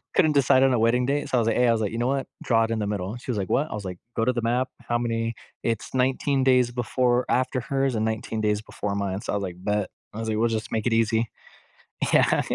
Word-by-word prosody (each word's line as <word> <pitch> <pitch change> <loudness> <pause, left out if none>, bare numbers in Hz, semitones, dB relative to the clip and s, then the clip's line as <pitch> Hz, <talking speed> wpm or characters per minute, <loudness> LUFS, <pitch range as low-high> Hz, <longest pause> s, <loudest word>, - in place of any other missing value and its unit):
couldn't 155 - +4
decide 135 -2 +4
on 135 -1 +4
a 120 - +2
wedding 120 +2 +3
date, 145 +2 -1
so 125 - +2
I - - +4
was 115 - +1
like, - - +2
"Hey," 125 0 +4
I - - +5
was 115 -1 +1
like, 105 - -1
"you 115 - -4
know 120 - 0
what? 135 0 -1 0.2
Draw 115 -2 +3
it 115 - -5
in 115 - 0
the 105 - -1
middle." 100 +2 -3
She 125 - -12
was 115 - 0
like, 95 -2 -2
"What?" 150 +3 +1
I - - -6
was 105 - -5
like, 90 -1 -5 0.2
"Go 115 - +1
to 125 - +3
the 120 - -1
map. 125 +3 0
How 120 - -1
many" 115 -1 -1 0.3
It's 115 +1 -2
19 130 +1 +1
days 125 -2 +4
before 125 +1 +1
after 130 +1 +1
hers 135 0 0
and 110 0 0
19 110 0 -2
days 105 0 +1
before 100 -2 -4
mine, 100 -1 -2
so - - -3
I - - +1
was 100 - -1
like, 90 -2 -4
"Bet." 105 -1 0 0.2
I 110 - -6
was 115 0 -3
like, 110 - 0
"We'll 115 +1 +3
just 110 -1 -3
make 110 +1 -1
it 115 - +2
easy." 115 0 +2 0.8
Yeah, - - +4
115 Hz, 285 wpm, -25 LUFS, 110-125 Hz, 0.8 s, I